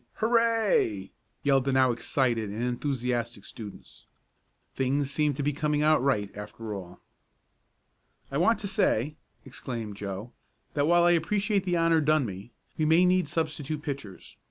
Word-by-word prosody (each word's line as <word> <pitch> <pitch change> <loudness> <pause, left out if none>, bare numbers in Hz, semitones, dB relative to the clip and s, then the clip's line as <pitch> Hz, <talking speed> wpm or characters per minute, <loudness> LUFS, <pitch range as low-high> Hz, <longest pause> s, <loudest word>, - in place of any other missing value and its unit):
Hurray!" 225 - +2 0.3
yelled 135 -2 +3
the 135 - +1
now 130 -1 +4
excited 120 -2 0
and 110 +4 -4
enthusiastic 120 -3 -2
students. 105 -3 -11 0.7
Things 135 +1 0
seemed 150 -1 +1
to 140 - -3
be 145 +1 +1
coming 150 0 0
out 155 -3 +4
right 105 -7 0
after 105 +1 -7
all. 90 -3 -8 1.3
"I 140 - -1
want 225 +7 +4
to 200 - -3
say," 150 - +1 0.3
exclaimed 115 -5 -6
Joe, 100 +3 -6 0.4
"that 145 0 +1
while 175 +1 +5
I 175 - +5
appreciate 195 +4 +1
the 175 -2 +1
honor 165 -1 +3
done 155 -2 +3
me, 100 +3 -7 0.3
we 155 - +2
may 165 +4 +5
need 180 -2 +3
substitute 155 -2 -3
pitchers. 135 - -7
140 Hz, 150 wpm, -28 LUFS, 115-165 Hz, 1.3 s, while